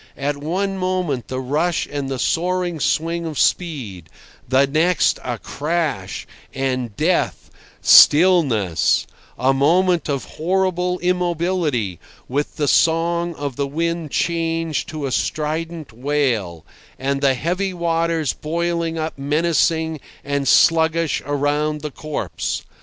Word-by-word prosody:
At 140 +1 -2
one 190 +6 -2
moment 180 - -1
the 130 - -4
rush 155 +7 0
and 140 -2 -4
the 135 - -2
soaring 175 +3 0
swing 165 +3 0
of 155 -3 -6
speed; 115 - -1 0.4
the 130 +2 +4
next 160 +6 +2
a 120 -2 -3
crash, 150 - -3 0.3
and 130 -5 -2
death, 170 +3 0 0.3
stillness—a 135 - +4
moment 170 +4 +2
of 140 -2 -1
horrible 180 +1 -1
immobility, 170 - 0 0.3
with 145 +3 -2
the 150 - -1
song 170 +2 +2
of 145 -4 -5
the 140 -1 -1
wind 165 +2 -2
changed 165 0 -1
to 155 -3 -4
a 135 - -3
strident 155 - -2
wail, 120 - -1 0.3
and 135 +1 -1
the 135 -2 +3
heavy 180 +8 -1
waters 165 -3 0
boiling 170 +1 -2
up 155 -2 -4
menacing 160 +2 +1 0.2
and 140 -1 -2
sluggish 165 +1 +3
around 145 +1 0
the 150 -1 -5
corpse. 155 +2 -4
155 Hz, 120 wpm, -20 LUFS, 140-170 Hz, 0.4 s, the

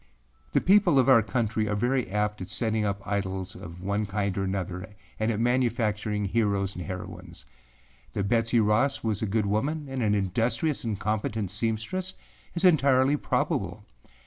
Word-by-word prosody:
The - - +3
people 190 -5 +5
of 130 - +4
our 130 -4 +7
country 110 0 -1
are 105 - 0
very 120 +2 0
apt 105 0 -1
at 90 - -5
setting 110 +3 0
up 100 -1 -2
idols 95 -2 -2
of 85 +2 -10
one 100 +2 -1
kind 100 -1 -1
or 95 - -1
another 95 -1 -3 0.3
and 110 +1 +1
at 110 - -2
manufacturing 115 -4 0
heros 100 -3 0
and 90 - -5
heroines. 95 -7 -8 0.7
That 100 - -1
Betsey 115 +1 +2
Ross 110 +6 +2
was 110 -3 -1
a 110 - 0
good 105 +1 +1
woman, 140 +10 -1
and 135 -1 -3
an 105 -2 +2
industrious 115 - 0
and 110 -4 -2
competent 110 -2 -2
seamstress 115 - -2 0.4
is 175 +2 +1
entirely 140 -4 +5
probable. - - -1
110 Hz, 165 wpm, -27 LUFS, 100-125 Hz, 0.7 s, our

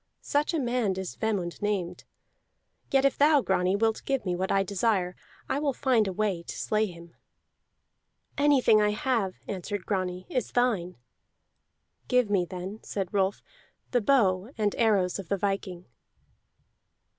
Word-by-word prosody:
Such 290 +1 +1
a - - +1
man 240 -6 0
is 190 -2 -5
Vemund 200 -6 -2
named. 190 -4 -2 0.8
Yet 270 0 +3
if 275 - +2
thou, 295 0 +5
Grani, 190 -3 +1
wilt 220 +1 +1
give 270 -5 -1
me 180 -1 0
what 185 +2 -2
I 195 0 +3
desire, 195 -2 0 0.3
I 280 - 0
will 290 -2 0
find 250 -6 +2
a - - -1
way 195 -2 -1
to - - -8
slay 215 0 +1
him." 170 -2 -12 1.2
"Anything 275 -7 +4
I 210 0 +2
have," 215 -4 0
answered 200 0 -4
Grani, 185 -2 -2
"is 255 - -3
thine." 215 -8 +1 1.1
"Give 250 -4 +2
me 185 -3 +2
then," 185 +4 -7
said 195 -2 -4
Rolf, 195 0 0 0.5
"the 245 - +2
bow 205 -5 +2
and 210 -2 +1
arrows 200 -5 +2
of 190 - -8
the 200 - +1
viking." 195 -2 -3
205 Hz, 150 wpm, -28 LUFS, 185-240 Hz, 1.2 s, thou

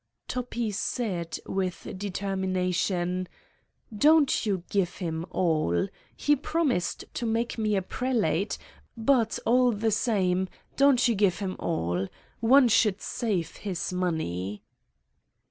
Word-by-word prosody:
Toppi 240 -3 -2
said 190 -5 -2
with 185 -2 -3
determination: 185 -2 -1 0.7
"Don't 295 -1 +4
you 190 -4 0
give 195 -4 +1
him 165 -1 -4
all. 155 - +1 0.3
He 295 - +3
promised 290 - -1
to 235 - -2
make 230 +1 -1
me 215 -1 +1
a 190 - 0
prelate, 205 - 0 0.4
but, 230 -1 +2
all 250 +1 +4
the 220 +1 0
same, 190 -5 +1 0.3
don't 275 -3 +5
you 235 - +3
give 195 -4 +2
him 190 -2 -3
all. 90 - -1 0.3
One 255 +3 +6
should 210 -3 +3
save 200 -9 -2
his 190 -2 -3
money." 105 - -2
195 Hz, 115 wpm, -27 LUFS, 180-235 Hz, 0.7 s, One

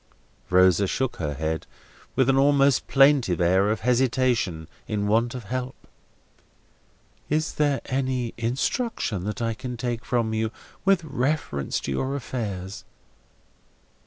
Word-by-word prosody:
Rosa 95 +1 +5
shook 130 +5 -2
her 75 -3 -3
head, 80 +2 -3 0.5
with 130 - +3
an 135 - +4
almost 140 0 +4
plaintive 135 - +4
air 95 +3 +3
of 105 -2 -1
hesitation 120 -8 +1 0.2
in 105 -2 -1
want 115 +4 +1
of 125 - -6
help. 125 +4 -4 1.5
"Is 155 +1 0
there 145 -2 +1
any 130 -3 -1
instruction 120 - -1
that 105 +2 -3
I 115 0 0
can 125 +2 -6
take 120 -1 -3
from 115 -3 0
you 110 0 0 0.4
with 195 -3 +4
reference 135 - -1
to - - -4
your 130 - -1
affairs?" 100 -7 -5
120 Hz, 130 wpm, -25 LUFS, 100-135 Hz, 1.5 s, Rosa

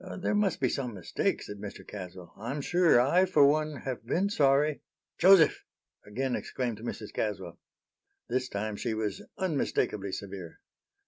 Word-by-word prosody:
"There 190 - -1
must 205 -4 +1
be 130 - +2
some 125 -3 -3
mistake," 85 -3 -1
said 105 - -8
Mr. 100 0 -8
Caswell. 90 -3 -9
"I'm 120 +7 -4
sure 175 -3 +4
I, 170 +9 +4
for 155 -6 +5
one, 150 -1 +1
have 130 -4 -4
been 185 - 0
sorry" 145 -2 +3 0.4
"Joseph!" 185 -4 +6 0.4
again 125 +5 -2
exclaimed 120 -4 -3
Mrs. 110 -2 -6
Caswell. 95 -5 -3 0.7
This 125 +1 -1
time 105 +1 -3
she 115 0 -2
was 105 -3 -3 0.2
unmistakably 140 - -1
severe. 95 -4 -7
125 Hz, 145 wpm, -29 LUFS, 105-150 Hz, 0.7 s, Joseph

